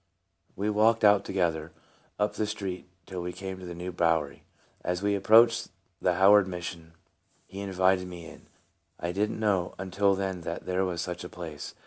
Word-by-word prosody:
We 105 Hz, +2 st, -1 dB
walked 110 Hz, +2 st, +3 dB
out 105 Hz, -1 st, +6 dB
together, 85 Hz, -4 st, -1 dB, 0.4 s
up 105 Hz, 0 st, 0 dB
the 105 Hz, -, -1 dB
street, 95 Hz, -4 st, -5 dB, 0.2 s
till 95 Hz, -2 st, -6 dB
we 90 Hz, 0 st, -4 dB
came 95 Hz, +1 st, -7 dB
to 90 Hz, -, -9 dB
the 85 Hz, -, -6 dB
New 90 Hz, +2 st, -5 dB
Bowery. 80 Hz, -4 st, 0 dB, 0.4 s
As 90 Hz, +2 st, -2 dB
we 100 Hz, 0 st, +2 dB
ap 100 Hz, -, -3 dB
proached 115 Hz, +3 st, +5 dB, 0.3 s
the 90 Hz, -1 st, +2 dB
Howard 95 Hz, +1 st, +6 dB
Mission 85 Hz, -2 st, -7 dB, 0.5 s
he 95 Hz, -, -9 dB
invited 95 Hz, -1 st, +1 dB
me 90 Hz, -2 st, -9 dB
in. -, -, -13 dB, 0.5 s
I 85 Hz, -, -2 dB
didn't 105 Hz, +4 st, -1 dB
know 100 Hz, -5 st, 0 dB
until 95 Hz, +1 st, +1 dB
then 95 Hz, -2 st, -3 dB
that 85 Hz, +1 st, -5 dB
there 95 Hz, +1 st, 0 dB
was 85 Hz, -2 st, -2 dB
such 90 Hz, 0 st, -5 dB
a 90 Hz, -, -7 dB
place. 80 Hz, -4 st, -8 dB
95 Hz, 180 wpm, -28 LUFS, 90-100 Hz, 0.5 s, out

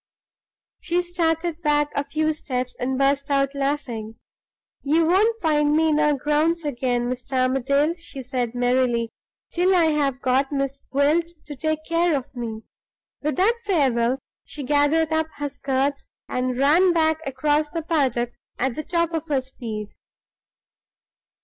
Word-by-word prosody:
She 350 Hz, +1 st, 0 dB
started 335 Hz, -1 st, -1 dB
back 295 Hz, -1 st, +2 dB
a 285 Hz, -, 0 dB
few 310 Hz, +2 st, 0 dB
steps, 255 Hz, -4 st, -4 dB
and 260 Hz, +1 st, -1 dB
burst 275 Hz, +1 st, +1 dB
out 275 Hz, 0 st, +1 dB
laughing. 275 Hz, -6 st, -3 dB, 0.7 s
"You 320 Hz, +4 st, +2 dB
won't 425 Hz, +7 st, +3 dB
find 300 Hz, -4 st, +2 dB
me 320 Hz, 0 st, +3 dB
in 300 Hz, -1 st, +2 dB
our 300 Hz, -1 st, +3 dB
grounds 300 Hz, +4 st, +1 dB
again, 245 Hz, -3 st, -1 dB
Mr. 250 Hz, +1 st, -5 dB
Armadale," 280 Hz, +4 st, +2 dB
she 330 Hz, -6 st, -10 dB
said, 245 Hz, -2 st, -3 dB
merrily, 245 Hz, -2 st, +1 dB, 0.4 s
"till 365 Hz, +2 st, +2 dB
I 330 Hz, -3 st, +4 dB
have 280 Hz, -4 st, 0 dB
got 270 Hz, +1 st, +1 dB
Miss 275 Hz, -1 st, -2 dB
Gwilt 305 Hz, +5 st, +2 dB
to 295 Hz, -, -7 dB
take 315 Hz, +2 st, -2 dB
care 335 Hz, -2 st, +2 dB
of 260 Hz, 0 st, -8 dB
me!" 225 Hz, -2 st, -5 dB, 0.6 s
With 300 Hz, +1 st, -1 dB
that 445 Hz, +6 st, +2 dB
farewell, 265 Hz, -, +2 dB, 0.3 s
she 295 Hz, -, -7 dB
gathered 295 Hz, +3 st, +2 dB
up 315 Hz, 0 st, +1 dB
her 290 Hz, 0 st, -3 dB
skirts, 275 Hz, 0 st, -1 dB, 0.2 s
and 250 Hz, 0 st, -1 dB
ran 330 Hz, +7 st, +4 dB
back 315 Hz, -1 st, +2 dB
across 295 Hz, +3 st, +1 dB
the 330 Hz, +1 st, -4 dB
paddock 260 Hz, -7 st, 0 dB, 0.3 s
at 260 Hz, 0 st, 0 dB
the 310 Hz, -, -4 dB
top 335 Hz, +1 st, 0 dB
of 320 Hz, -2 st, -3 dB
her 280 Hz, -3 st, +1 dB
speed. 225 Hz, -5 st, -7 dB
290 Hz, 150 wpm, -23 LUFS, 260-320 Hz, 0.7 s, I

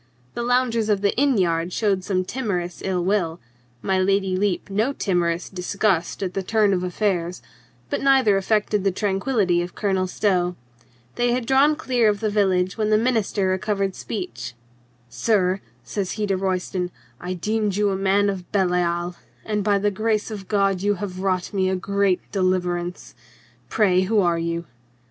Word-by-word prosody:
The -, -, -3 dB
loungers 240 Hz, -2 st, +1 dB
of 205 Hz, -2 st, +2 dB
the 200 Hz, -1 st, +1 dB
inn 275 Hz, -2 st, +3 dB
yard 170 Hz, -2 st, +1 dB
showed 195 Hz, -2 st, 0 dB
some 185 Hz, -2 st, 0 dB
timorous 180 Hz, -, -3 dB
ill 180 Hz, -2 st, -1 dB
will, 180 Hz, -4 st, 0 dB, 0.4 s
my 190 Hz, -1 st, +1 dB
Lady 195 Hz, 0 st, +1 dB
Lepe 200 Hz, 0 st, -1 dB
no 220 Hz, +8 st, +1 dB
timorous 175 Hz, -6 st, 0 dB
disgust 190 Hz, 0 st, -1 dB
at 185 Hz, -1 st, -3 dB
the 195 Hz, -, -1 dB
turn 210 Hz, +1 st, +2 dB
of 180 Hz, -1 st, 0 dB
affairs, 180 Hz, -2 st, -1 dB, 0.4 s
but -, -, -2 dB
neither 265 Hz, -7 st, +4 dB
affected 210 Hz, +1 st, +1 dB
the 195 Hz, -, +2 dB
tran 195 Hz, 0 st, -1 dB
quillity 195 Hz, -8 st, +1 dB
of 175 Hz, -, -8 dB
Colonel 190 Hz, -3 st, 0 dB
Stow. 180 Hz, -2 st, 0 dB, 0.6 s
They 240 Hz, 0 st, +2 dB
had 250 Hz, -1 st, -1 dB
drawn 275 Hz, +4 st, +4 dB
clear 250 Hz, -7 st, +2 dB
of 205 Hz, -1 st, 0 dB
the 215 Hz, 0 st, -1 dB
village 185 Hz, -1 st, +1 dB
when 215 Hz, -1 st, +1 dB
the 215 Hz, -, +5 dB
minister 220 Hz, -4 st, +1 dB
recovered 195 Hz, +1 st, 0 dB
speech. 120 Hz, -, -6 dB, 0.5 s
"Sir," 185 Hz, -, +1 dB, 0.2 s
says 195 Hz, -3 st, -3 dB
he 215 Hz, -1 st, -2 dB
to 195 Hz, -1 st, 0 dB
Royston, 185 Hz, -1 st, -1 dB, 0.3 s
"I 180 Hz, +1 st, -4 dB
deemed 210 Hz, +2 st, -1 dB
you 205 Hz, 0 st, +2 dB
a -, -, 0 dB
man 195 Hz, +1 st, +2 dB
of 190 Hz, -3 st, -4 dB
Belial, 175 Hz, -2 st, 0 dB, 0.3 s
and 210 Hz, -2 st, -1 dB
by 205 Hz, 0 st, +3 dB
the 205 Hz, +1 st, +1 dB
grace 215 Hz, +2 st, -1 dB
of 200 Hz, -3 st, -7 dB
God 195 Hz, -3 st, +1 dB
you 205 Hz, +1 st, +2 dB
have 185 Hz, -1 st, -5 dB
wrought 185 Hz, 0 st, -1 dB
me 190 Hz, -1 st, +1 dB
a 190 Hz, -, +1 dB
great 200 Hz, 0 st, +1 dB
deliverance. 180 Hz, -2 st, -1 dB, 0.6 s
Pray, 190 Hz, -4 st, +3 dB
who 210 Hz, +3 st, +2 dB
are 170 Hz, -3 st, +2 dB
you 170 Hz, 0 st, -2 dB
195 Hz, 170 wpm, -23 LUFS, 180-210 Hz, 0.6 s, the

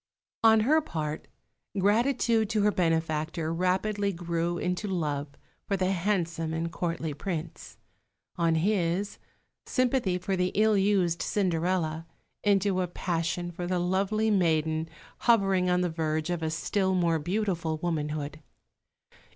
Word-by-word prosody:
On 220 Hz, -1 st, +6 dB
her 305 Hz, +8 st, +4 dB
part, 155 Hz, -, -4 dB, 0.5 s
gratitude 225 Hz, +2 st, +2 dB
to 215 Hz, -2 st, +1 dB
her 210 Hz, -, +4 dB
benefactor 160 Hz, -2 st, 0 dB
rapidly 200 Hz, +4 st, 0 dB
grew 170 Hz, -1 st, -2 dB
into 180 Hz, +4 st, -2 dB
love 150 Hz, -6 st, -1 dB, 0.4 s
for 200 Hz, -, 0 dB
the 185 Hz, 0 st, +1 dB
handsome 170 Hz, -4 st, -1 dB
and 165 Hz, +1 st, -2 dB
courtly 165 Hz, -3 st, -3 dB
Prince; 165 Hz, +1 st, -6 dB, 0.6 s
on 165 Hz, -2 st, +2 dB
his, 185 Hz, +2 st, 0 dB, 0.5 s
sympathy 250 Hz, -7 st, +1 dB
for 190 Hz, +2 st, -2 dB
the 180 Hz, 0 st, 0 dB
ill 215 Hz, +1 st, +4 dB
used 190 Hz, -4 st, +2 dB
Cinderella, 170 Hz, -4 st, 0 dB, 0.4 s
into 195 Hz, -2 st, +2 dB
a 180 Hz, -, -1 dB
passion 175 Hz, 0 st, -2 dB
for 175 Hz, 0 st, -5 dB
the 180 Hz, 0 st, 0 dB
lovely 195 Hz, +5 st, +1 dB
maiden 160 Hz, -4 st, +1 dB, 0.3 s
hovering 195 Hz, -6 st, +3 dB
on 180 Hz, 0 st, +2 dB
the 180 Hz, -, +1 dB
verge 160 Hz, 0 st, -1 dB
of 175 Hz, -2 st, -2 dB
a 160 Hz, -, -1 dB
still 190 Hz, +5 st, 0 dB
more 170 Hz, -3 st, +2 dB
beautiful 175 Hz, -2 st, -1 dB
womanhood. 155 Hz, -2 st, -3 dB
180 Hz, 130 wpm, -28 LUFS, 165-200 Hz, 0.6 s, On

